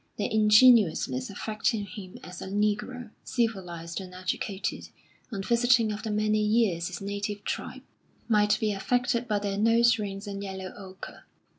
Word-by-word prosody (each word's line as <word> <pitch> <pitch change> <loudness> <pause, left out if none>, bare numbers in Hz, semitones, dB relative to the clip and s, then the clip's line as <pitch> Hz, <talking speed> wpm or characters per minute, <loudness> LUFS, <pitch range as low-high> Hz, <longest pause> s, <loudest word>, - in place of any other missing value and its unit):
Their 205 - -1
ingenuousness 210 - +5
affected 215 0 -2
him 190 -4 -9
as 180 -1 -9
a - - -6
negro, 210 +4 -1
civilised 180 -8 -2
and 185 -1 -10
educated, 185 +2 -3 0.4
on 195 -3 -4
visiting 235 0 +3
after 215 +1 -4
many 215 0 +1
years 210 -6 +2
his 185 0 -7
native 205 +1 -4
tribe, - - -5 0.4
might 210 -2 +3
be 215 -1 +1
affected 245 +4 0
by 210 -2 +1
their 200 -1 -2
nose 230 +1 +4
rings 200 -1 -5
and 200 -1 -5
yellow 190 -1 -6
ochre. 190 -2 -10
210 Hz, 145 wpm, -28 LUFS, 195-225 Hz, 0.4 s, ingenuousness